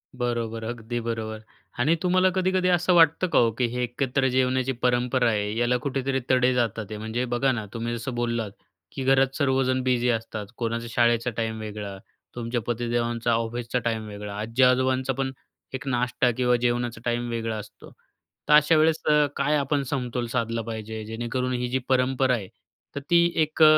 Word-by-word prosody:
बरोबर, 120 Hz, -2 st, -2 dB
अगदी 120 Hz, +1 st, -4 dB
बरोबर. 110 Hz, -1 st, -4 dB, 0.4 s
आणि 150 Hz, +7 st, +3 dB
तुम्हाला 185 Hz, +1 st, +4 dB
कधी-कधी 185 Hz, 0 st, +1 dB
असं 180 Hz, 0 st, +3 dB
वाटतं 165 Hz, +2 st, +5 dB
का -, -, +3 dB
हो, 115 Hz, -1 st, +4 dB
की 120 Hz, +3 st, 0 dB
हे 125 Hz, +1 st, -3 dB
एकत्र 130 Hz, +2 st, 0 dB
जेवणाची 130 Hz, 0 st, +1 dB
परंपरा 125 Hz, 0 st, +2 dB
आहे 105 Hz, 0 st, -1 dB
याला 120 Hz, +1 st, +2 dB
कुठेतरी 135 Hz, -1 st, -1 dB
तडे 130 Hz, 0 st, +4 dB
जातात 115 Hz, -3 st, 0 dB
ते? 105 Hz, -, -5 dB
म्हणजे 110 Hz, +3 st, -3 dB
बघा 135 Hz, +2 st, +2 dB
ना 110 Hz, -4 st, -3 dB
तुम्ही 115 Hz, +1 st, -3 dB
जसं 120 Hz, +2 st, -5 dB
बोललात, 115 Hz, -3 st, -1 dB, 0.4 s
की 135 Hz, -, -5 dB
घरात 135 Hz, 0 st, +3 dB
सर्वजण 130 Hz, -2 st, +1 dB
बिझी 125 Hz, -1 st, +1 dB
असतात, 110 Hz, -2 st, -2 dB
कोणाचा 115 Hz, 0 st, -2 dB
शाळेचा 120 Hz, 0 st, +2 dB
टाईम 110 Hz, -1 st, -2 dB
वेगळा, 105 Hz, -2 st, -6 dB, 0.4 s
तुमच्या 120 Hz, 0 st, -2 dB
पतीदेवांचा 120 Hz, 0 st, -1 dB
ऑफिसचा 115 Hz, +2 st, -1 dB
टाईम 110 Hz, -2 st, -1 dB
वेगळा, 105 Hz, -1 st, -7 dB
आजी-आजोबांचापण 130 Hz, +3 st, +2 dB, 0.4 s
एक 135 Hz, +1 st, -6 dB
नाष्टा 125 Hz, 0 st, +1 dB
किंवा 125 Hz, -1 st, +3 dB
जेवणाचा 120 Hz, -1 st, -1 dB
टाईम 120 Hz, 0 st, -1 dB
वेगळा 115 Hz, -1 st, -2 dB
असतो, 105 Hz, -, -11 dB, 0.6 s
तर 150 Hz, -, +4 dB
अशा 150 Hz, +2 st, +6 dB
वेळेस 160 Hz, +1 st, +3 dB, 0.3 s
काय 145 Hz, +2 st, +1 dB
आपण 140 Hz, 0 st, 0 dB
समतोल 125 Hz, -2 st, -2 dB
साधला 115 Hz, -1 st, -1 dB
पाहिजे 110 Hz, -1 st, -6 dB
जेणेकरून 120 Hz, +3 st, -3 dB
ही, 125 Hz, 0 st, -1 dB
जी 130 Hz, +1 st, 0 dB
परंपरा 130 Hz, 0 st, +2 dB
आहे 100 Hz, -5 st, -5 dB, 0.5 s
तर 140 Hz, -, -2 dB
ती 170 Hz, 0 st, +5 dB, 0.2 s
एक 155 Hz, +1 st, +2 dB
120 Hz, 165 wpm, -25 LUFS, 115-130 Hz, 0.6 s, अशा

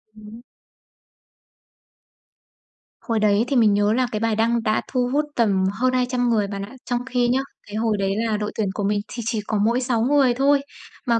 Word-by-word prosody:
Ừm. 215 Hz, +2 st, -12 dB, 2.6 s
Hồi 230 Hz, -2 st, -1 dB
đấy 210 Hz, 0 st, +3 dB
thì 275 Hz, -, -1 dB
mình 220 Hz, -4 st, +4 dB
nhớ 205 Hz, +1 st, +2 dB
là 250 Hz, +1 st, +1 dB
cái 215 Hz, -, -2 dB
bài 225 Hz, 0 st, 0 dB
đăng 230 Hz, +1 st, +1 dB
đã 215 Hz, -1 st, +1 dB
thu 250 Hz, -1 st, -1 dB
hút 295 Hz, +1 st, +2 dB
tầm 200 Hz, -5 st, +2 dB
hơn 255 Hz, +4 st, 0 dB
200 250 Hz, -1 st, 0 dB
người 215 Hz, -3 st, +1 dB
bạn 200 Hz, 0 st, -5 dB
ạ. 205 Hz, -, -14 dB
Trong 245 Hz, -1 st, -1 dB
khi 250 Hz, -2 st, 0 dB
nhá, 250 Hz, +2 st, +2 dB, 0.3 s
cái 205 Hz, -, -8 dB
hồi 220 Hz, -1 st, 0 dB
đấy 195 Hz, -1 st, 0 dB
là 220 Hz, -2 st, 0 dB
đội 210 Hz, 0 st, -3 dB
tuyển 210 Hz, -3 st, -1 dB
của 205 Hz, -, -3 dB
mình 205 Hz, +1 st, +1 dB
thì 235 Hz, -2 st, -6 dB
chỉ 220 Hz, -1 st, -1 dB
có 215 Hz, -, 0 dB
mỗi 240 Hz, +3 st, +1 dB
6 240 Hz, -3 st, 0 dB
người 270 Hz, 0 st, +3 dB
thôi, 275 Hz, +3 st, +3 dB, 0.4 s
mà, 235 Hz, -2 st, +2 dB
230 Hz, 205 wpm, -22 LUFS, 210-250 Hz, 2.6 s, mình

